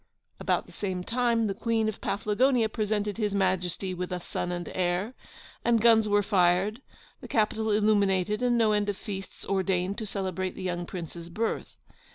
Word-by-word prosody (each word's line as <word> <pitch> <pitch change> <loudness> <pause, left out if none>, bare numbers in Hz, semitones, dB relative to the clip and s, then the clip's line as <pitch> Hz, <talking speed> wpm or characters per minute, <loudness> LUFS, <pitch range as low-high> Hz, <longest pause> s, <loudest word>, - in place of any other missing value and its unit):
About - - 0
the - - -16
same 185 -3 -3
time 235 +1 +1
the 200 - 0
Queen 225 +1 0
of 215 - -4
Paflagonia 220 +4 +2
presented 210 -1 -1
His 210 -2 0
Majesty 185 -1 0
with 180 0 -4
a 180 - -2
son 175 0 -4
and 175 -1 -4
heir; 185 +5 0 0.5
and 235 -1 +3
guns 220 -1 +5
were 205 0 +3
fired, 195 +3 +2 0.4
the - - -9
capital 220 0 +1
illuminated, 210 -1 +2
and 245 -1 +3
no 225 -2 +4
end 210 -1 +1
of 200 - -2
feasts 195 -2 -7
ordained 190 +1 0
to 220 - -4
celebrate 190 -2 -3
the 190 - -7
young 175 -1 -2
Prince's 170 -1 -7
birth. 220 +6 -3
205 Hz, 175 wpm, -28 LUFS, 185-220 Hz, 0.5 s, guns